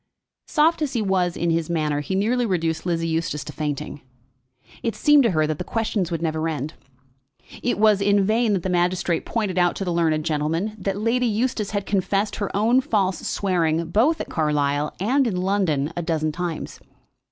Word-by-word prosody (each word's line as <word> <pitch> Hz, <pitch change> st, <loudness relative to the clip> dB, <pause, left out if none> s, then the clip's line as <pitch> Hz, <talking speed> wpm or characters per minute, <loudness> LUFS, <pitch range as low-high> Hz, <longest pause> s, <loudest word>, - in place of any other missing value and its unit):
Soft 320 Hz, +1 st, +2 dB
as 290 Hz, -3 st, -1 dB
he 235 Hz, -, 0 dB
was 185 Hz, -3 st, 0 dB
in 170 Hz, -1 st, 0 dB
his 165 Hz, -1 st, 0 dB
manner, 155 Hz, -3 st, 0 dB
he 170 Hz, +6 st, -3 dB
nearly 235 Hz, +6 st, +1 dB
reduced 170 Hz, -5 st, -1 dB
Lizzie 165 Hz, -1 st, 0 dB
Eustace 160 Hz, -3 st, -2 dB
to 150 Hz, -, -8 dB
fainting. 150 Hz, -1 st, -4 dB, 0.8 s
It 230 Hz, -, -2 dB
seemed 295 Hz, -1 st, +5 dB
to 235 Hz, -, +3 dB
her 155 Hz, -5 st, +2 dB
that 155 Hz, -1 st, -3 dB
the -, -, -2 dB
questions 220 Hz, -3 st, -1 dB
would 165 Hz, -2 st, -3 dB
never 160 Hz, 0 st, -1 dB
end. 155 Hz, 0 st, -4 dB, 0.9 s
It 245 Hz, -, 0 dB
was 210 Hz, -1 st, +4 dB
in 200 Hz, 0 st, +3 dB
vain 220 Hz, +1 st, +2 dB
that 185 Hz, -4 st, -1 dB
the 190 Hz, -, -2 dB
magistrate 175 Hz, -1 st, 0 dB
pointed 205 Hz, -6 st, -1 dB
out 175 Hz, -1 st, +3 dB
to 195 Hz, -, -3 dB
the 175 Hz, -, -1 dB
learned 160 Hz, -2 st, +1 dB
gentleman 165 Hz, +6 st, -1 dB
that 195 Hz, 0 st, -2 dB
Lady 235 Hz, +4 st, +1 dB
Eustace 225 Hz, -1 st, -1 dB
had 205 Hz, -1 st, -2 dB
confessed 200 Hz, +1 st, 0 dB
her 200 Hz, -2 st, -2 dB
own 235 Hz, +5 st, +3 dB
false 195 Hz, -6 st, 0 dB
swearing, 170 Hz, -4 st, 0 dB
both 270 Hz, -, +3 dB
at -, -, -4 dB
Carlisle 150 Hz, -2 st, 0 dB
and 255 Hz, +7 st, +2 dB
in 205 Hz, -, -1 dB
London, 180 Hz, -6 st, 0 dB
a 175 Hz, -, -2 dB
dozen 160 Hz, -2 st, -1 dB
times. 170 Hz, 0 st, -5 dB
180 Hz, 190 wpm, -23 LUFS, 160-215 Hz, 0.9 s, seemed